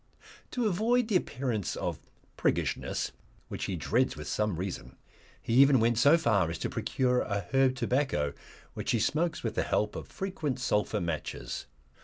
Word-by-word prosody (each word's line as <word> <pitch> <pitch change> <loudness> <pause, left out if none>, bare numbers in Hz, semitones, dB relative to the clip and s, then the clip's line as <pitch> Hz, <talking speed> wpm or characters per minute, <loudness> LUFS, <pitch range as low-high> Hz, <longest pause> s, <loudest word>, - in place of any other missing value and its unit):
To 245 -2 -1
avoid 220 +4 +2
the 210 - +1
appearance 125 - -1
of - - -3 0.4
priggishness, - - -1 0.4
which - - -4
he 95 - -2
dreads 115 - +1
with 75 - -7
some 105 -3 0
reason, 85 -8 -5 0.4
he 115 - -3
even 135 +1 +7
went 115 0 +2
so 145 +6 +6
far 105 - +2
as 85 - -3
to - - -3
procure 125 -1 +1
a 100 -2 -2
herb 135 -1 +4
tobacco, 125 - 0 0.4
which - - -5
he 115 - +2
smokes 155 +7 0
with 115 - -1
the - - +1
help 105 0 0
of - - -6
frequent 165 -9 -3
sulphur 105 -3 0
matches. 85 -3 -4
120 Hz, 165 wpm, -30 LUFS, 100-145 Hz, 0.4 s, even